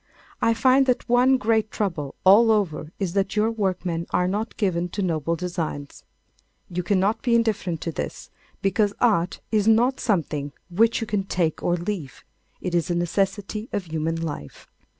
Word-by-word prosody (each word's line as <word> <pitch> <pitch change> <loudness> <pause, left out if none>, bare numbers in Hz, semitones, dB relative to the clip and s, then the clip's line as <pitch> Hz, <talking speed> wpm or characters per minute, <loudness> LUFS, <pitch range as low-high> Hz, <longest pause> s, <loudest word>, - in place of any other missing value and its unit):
I 230 - +3
find 265 +3 +4
that 250 - +1
one 250 +2 +4
great 220 -2 +1
trouble 165 -11 -3
all 210 +5 +7
over 175 -8 0
is 190 -4 -2
that 195 +1 0
your 215 +2 +2
workmen 185 -5 -2
are 180 - +1
not 210 +4 -3
given 180 -4 0
to 200 +3 -3
noble 165 -2 0
designs. 165 -5 -5 0.7
You 180 +1 -1
cannot 195 +3 +1
be 240 -2 +2
indifferent 205 -8 0
to 165 - -3
this, - - -6 0.3
because 205 +1 +1
Art 185 -7 +1
is 215 -1 +2
not 240 +4 +4
something 150 - -1 0.2
which 225 +6 +3
you - - -1
can 205 -3 -1
take 170 -5 -1
or 175 - +1
leave. 175 -5 -5 0.4
It 180 - -3
is 170 -1 +1
a 175 - 0
necessity 195 - -1
of 200 -3 -2
human 160 +1 -1
life. 145 - -6
195 Hz, 170 wpm, -24 LUFS, 170-220 Hz, 0.7 s, all